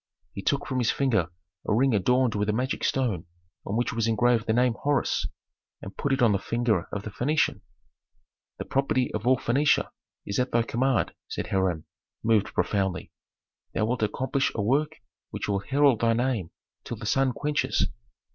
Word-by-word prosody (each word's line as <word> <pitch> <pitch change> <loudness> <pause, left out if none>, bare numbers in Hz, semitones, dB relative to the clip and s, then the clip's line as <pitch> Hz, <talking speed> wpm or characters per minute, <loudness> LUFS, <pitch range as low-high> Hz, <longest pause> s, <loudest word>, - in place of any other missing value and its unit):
He 100 - -5
took 140 +7 0
from 130 -1 -2
his 120 - +1
finger 110 -11 +1 0.4
a - - +2
ring 130 +2 +3
adorned 125 +3 +2
with 105 0 -1
a - - +2
magic 130 +4 -2
stone 110 -11 0 0.4
on 100 - -1
which 120 - 0
was 115 -1 0
engraved 115 +1 +2
the - - +2
name 125 +1 +3
Horus, 145 -3 +1 0.5
and 95 - -9
put 140 - -2
it 135 -2 +2
on 115 - +5
the 100 - +1
finger 115 -4 0
of 105 - -4
the 105 - -6
Phœnician. 145 -3 0 1.0
"The - - -5
property 135 -2 0
of 110 +2 -3
all 130 0 +5
Phœnicia 135 +6 +2 0.4
is 100 - -2
at 125 0 +1
thy 120 0 +3
command," 120 - 0
said - - -4
Hiram, 95 -5 0 0.4
moved 110 -2 +2
profoundly. 95 -3 -1 0.6
"Thou 110 - +2
wilt 120 +1 -1
accomplish 130 +5 0
a 110 - 0
work 145 +8 +1 0.4
which - - -5
will 100 -1 +1
herald 140 +2 +2
thy 115 0 +3
name 120 -7 -1 0.3
till - - -6
the - - -8
sun 135 -1 +2
quenches." 145 +3 0
120 Hz, 180 wpm, -26 LUFS, 105-130 Hz, 1.0 s, on